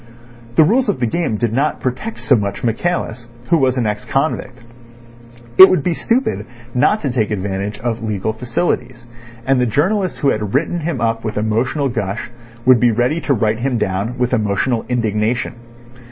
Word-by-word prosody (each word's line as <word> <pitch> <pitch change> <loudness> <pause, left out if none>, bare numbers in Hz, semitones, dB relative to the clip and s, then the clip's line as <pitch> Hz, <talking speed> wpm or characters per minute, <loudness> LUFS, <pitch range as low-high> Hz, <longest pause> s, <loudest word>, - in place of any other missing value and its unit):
The 160 - +7
rules 230 +8 +2
of 200 - 0
the 120 - +1
game 120 -2 -1
did 115 0 -1
not 140 +5 0
protect 130 - -4
so 135 - +4
much 100 -3 -2
Michaelis, 120 -1 -2 0.2
who 170 - +5
was 130 -1 +2
an 120 - 0
ex 105 -1 -2
convict. 135 -2 -2 1.0
It 190 - +12
would 180 -6 +1
be 175 - +1
stupid 240 +9 -1 0.3
not 165 - +2
to 140 - -1
take 110 -4 0
advantage 100 0 -3
of 115 -1 -2
legal 110 -1 -2
facilities, 125 0 -2 0.4
and 135 -1 +2
the 125 - +2
journalists 185 - 0
who 140 - +2
had 105 +1 -3
written 170 +4 0
him 165 +1 -3
up 115 0 -1
with 110 -2 -4
emotional 115 +7 0
gush 115 -2 -3 0.3
would 130 -1 +6
be 125 - +4
ready 125 +8 0
to 140 - +1
write 110 0 0
him 125 0 0
down 100 +4 -2
with 125 0 0
emotional 110 +2 0
indignation. 115 0 0
125 Hz, 180 wpm, -18 LUFS, 110-140 Hz, 1.0 s, It